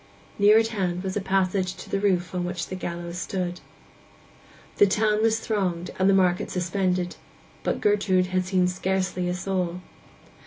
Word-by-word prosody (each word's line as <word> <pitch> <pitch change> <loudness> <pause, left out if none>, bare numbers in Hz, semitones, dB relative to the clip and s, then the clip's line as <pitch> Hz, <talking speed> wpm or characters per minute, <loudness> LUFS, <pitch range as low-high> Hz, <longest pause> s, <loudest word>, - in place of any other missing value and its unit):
Near 205 +2 +7
at 225 0 +3
hand 185 -5 -2
was 190 -1 -3
a 205 - 0
passage 190 -1 0
to - - -10
the 195 - -1
roof 185 -4 +1
on 180 -1 -1
which 180 0 -3
the 185 - -4
gallows 175 -1 -5
stood. 180 -2 -3 1.2
The 205 - +6
town 210 +2 +2
was 225 0 +3
thronged, 185 -6 -2
and 190 +1 +4
the - - +5
market 180 -2 +2
suspended; 180 0 -1 0.4
but - - -2
Gertrude 200 -3 +3
had 185 0 +2
seen 185 -1 +2
scarcely 185 0 -1
a 180 - -1
soul. 180 -1 -2
185 Hz, 165 wpm, -25 LUFS, 180-195 Hz, 1.2 s, Near